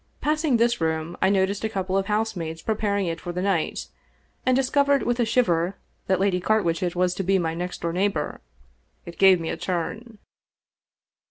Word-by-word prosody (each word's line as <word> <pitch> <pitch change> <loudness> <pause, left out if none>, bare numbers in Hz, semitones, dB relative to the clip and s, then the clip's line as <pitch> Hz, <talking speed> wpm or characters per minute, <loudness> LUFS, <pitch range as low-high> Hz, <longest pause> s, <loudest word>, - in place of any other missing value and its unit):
Passing 305 -3 +1
this 235 -3 +2
room 160 +1 -1
I - - +4
noticed 195 +1 +1
a 220 - 0
couple 190 -2 -2
of 195 0 +1
housemaids 205 -7 -2
preparing 205 -2 0
it 165 -1 -3
for 175 - -5
the 180 +1 -3
night, 195 -5 0 0.6
and 255 - +4
discovered 280 +1 +2
with 240 0 0
a 240 - +3
shiver 195 -6 +1 0.3
that 190 -1 +2
Lady 190 -2 +2
Carwitchet 180 -4 +1
was'^>to 180 +1 0
be 195 +1 +3
my 165 -3 -1
next 180 +2 -5
door 170 -1 -2
neighbor. 185 -4 -1 0.6
It 170 - -10
gave 190 -2 +7
me 165 - -4
a - - -3
turn. 185 +6 -4
190 Hz, 175 wpm, -24 LUFS, 175-220 Hz, 0.6 s, gave